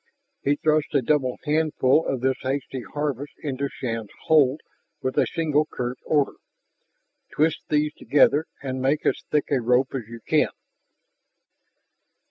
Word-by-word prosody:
He 145 - +2
thrust 155 0 +1
a 135 - +3
double 130 -1 +1
handful 155 -1 +2
of 130 -3 -1
this 130 0 +1
hasty 135 -1 -3
harvest 145 +1 -4
into 140 -1 -2
Shann's 115 -4 -4
hold 150 -2 +4 0.4
with 130 - -1
a - - +3
single 155 -2 +1
curt 125 0 -4
order: 145 -3 +1 1.0
"Twist 155 +1 +2
these 150 0 +1
together 150 +1 +3 0.2
and 130 -1 -3
make 140 +3 +1
as - - +1
thick 150 -1 0
a 135 -3 +2
rope 125 +3 +2
as 125 -5 -4
you 115 0 -10
can!" - - +3
140 Hz, 140 wpm, -24 LUFS, 130-150 Hz, 1.0 s, hold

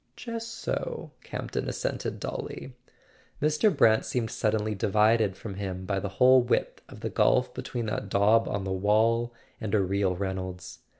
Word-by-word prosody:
"Just 230 -1 -6
so," 225 - -4
Campton - - -4
assented - - -3
dully. - - -5 0.7
Mr. 155 +7 +3
Brant 110 -3 +5
seemed 115 -3 -2
suddenly 110 0 0
divided 105 0 +2
from 100 0 -7
him 95 -1 -5
by 100 0 -1
the 100 - -4
whole 130 0 +7
width 120 - -1
of - - -12
the - - -2
gulf - - +3
between 120 -2 -4
that 105 -1 -3
daub 105 +4 +4
on 100 -1 -2
the 95 - -3
wall 110 +5 +2 0.3
and 110 -2 -1
a - - +4
real 95 -1 +1
Reynolds. 95 -1 -5
105 Hz, 160 wpm, -28 LUFS, 95-115 Hz, 0.7 s, whole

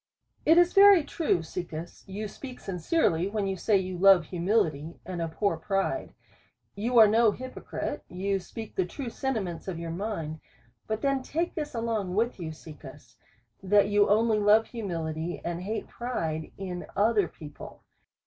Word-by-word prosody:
It 325 +2 +7
is 350 0 +5
very 395 -4 +8
true, 290 - 0
Caecus, 165 0 -7
you 205 +3 -4
speak 255 +4 -9
sincerely 180 - 0
when 205 0 -2
you 195 0 -1
say 205 +2 +2
you 185 -1 -3
love 190 -3 +7
humility, 170 -4 0
and 175 -1 -4
abhor 165 +5 -1
pride. 195 +11 -2 0.6
You 235 +5 -1
are 220 -2 +10
no 225 +1 +4
hyprocrite, 255 +4 -5
you 195 +2 -1
speak 220 +4 -8
the 185 - +1
true 245 +5 -6
sentiments 210 -13 -3
of 185 -3 -3
your 165 0 -5
mind; 165 -5 -4 0.5
but 220 0 -3
then 275 -1 +1
take 330 +6 -2
this 300 -5 -4
along 220 -5 -2
with 230 0 0
you, 165 -2 -4
Caecus, 145 -5 -12 0.5
that 200 +1 +4
you 205 0 +4
only 215 +1 +3
love 210 +2 +5
humility, 170 -6 -4
and 170 0 -3
hate 215 +4 -4
pride, 160 -11 -3
in 180 -2 -5
other 205 -2 +3
peo 150 - -11
ple. 145 - -12
195 Hz, 160 wpm, -28 LUFS, 170-225 Hz, 0.6 s, are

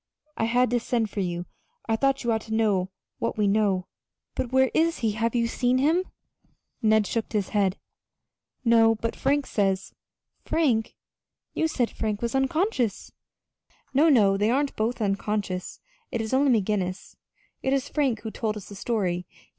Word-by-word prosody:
I 225 - 0
had 245 +1 +2
to 245 - +2
send 230 -2 -1
for - - -4
you 175 -2 -2 0.4
I 225 - +2
thought 275 +3 +1
you 240 - +1
ought 220 0 0
to - - -2
know 200 -4 +1 0.3
what 230 - -2
we 210 - +2
know." 200 -3 +2 0.5
"But 250 - -3
where 265 0 +3
is 330 +1 +2
he? 220 - +3
Have 230 +2 -1
you 235 -1 +2
seen 245 +2 +1
him?" 320 +7 +2 0.8
Ned 220 -1 +4
shook 225 +3 -2
his 205 -3 -1
head. 200 -2 +1 0.9
"No; 225 -1 +5
but 230 +1 -3
Frank 280 +1 +1
says 195 -2 -1 0.2
" - - -52
"Frank! 255 -9 +1 0.6
But - - -6
you 320 - +4
said 255 -7 -1
Frank 215 0 -3
was 235 - -1
unconscious!" 270 - 0 0.8
"No, 300 +5 +5
no 205 -8 +5
they 210 +2 +2
aren't 275 +3 +1
both 225 +2 -1
unconscious 200 -2 -2 0.3
it 235 - -3
is 225 +2 -3
only 265 -3 +4
McGinnis. 190 -2 -3 0.5
It 265 - 0
is 275 0 +1
Frank 270 -7 0
who 220 - -5
told 215 -1 -2
us 205 - -10
the 200 - -9
story. 190 -5 -1
225 Hz, 175 wpm, -26 LUFS, 205-260 Hz, 0.9 s, No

